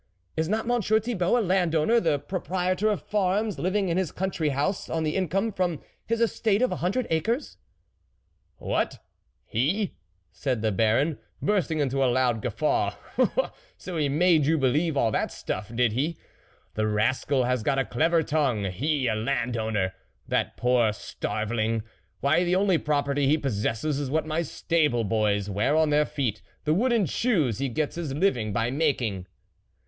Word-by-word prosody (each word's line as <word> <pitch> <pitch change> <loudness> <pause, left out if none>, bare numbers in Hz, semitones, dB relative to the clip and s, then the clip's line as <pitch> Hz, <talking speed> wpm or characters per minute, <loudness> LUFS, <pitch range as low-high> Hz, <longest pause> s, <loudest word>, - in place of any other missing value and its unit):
" 90 -1 -44
Is 160 +1 -1
not 220 +2 0
Monsieur 225 -3 +2
Thibault 220 -2 0
a - - +2
landowner, 180 +2 +2
the 160 -7 +1
proprietor 185 +5 -1
of 210 - -1
farms, 205 +1 0
living 190 +2 0
in 170 0 0
his 185 -5 0
country 180 -5 -1
house 145 +8 -1
on 160 0 -1
the 155 -1 -1
income 195 +4 0
from 180 -5 -1 0.3
his 230 0 0
estate 225 -1 +1
of 255 - +2
a - - -2
hundred 200 +9 0
acres? 225 - -1 0.4
" - - -44
" - - -44
What, - - -1 0.5
he? 170 - 0 0.2
" 90 -2 -44
said 125 -6 -2
the 110 - +2
Baron, 115 - +2 0.2
bursting 185 -6 0
into 135 -2 +1
a 130 - +3
loud 120 -3 +1
guffaw, 125 +7 0 0.4
" - - -4
so 185 - -7
he 150 -3 +1
made 155 0 +3
you 160 +1 +3
be 135 -3 +3
lieve 155 +3 0
all 115 -4 +2
that - - -1
stuff, 95 +3 -5
did 120 -1 +3
he? 145 +9 -1 0.6
the 110 0 0
rascal 125 +5 +1
has 125 -1 0
got 135 +5 0
a 135 - +1
clever 165 +5 +2
tongue. 140 -9 0
He! 140 - 0
a - - +2
landowner! 110 -4 -1 0.3
that - - -1
poor 120 -3 +3
starveling! 110 - -2 0.4
why, 155 +6 +3
the 180 0 +1
only 190 -3 +3
pro 145 -1 +1
perty 140 0 0
he 150 +3 +4
possesses 135 +2 -1
is 140 -3 -3
what 155 +2 0
my 155 +1 -1
stable 150 -6 0
boys 105 -2 +1
wear 105 +9 +1
on 155 -1 +3
their 150 0 +3
feet 125 -8 -2 0.2
the 155 - +2
wooden 230 +2 +2
shoes 160 - +1
he 135 -1 -1
gets 150 +6 -2
his 155 -6 -3
living 125 - +1
by 115 +4 0
making." 125 - 0
150 Hz, 180 wpm, -26 LUFS, 120-180 Hz, 0.6 s, he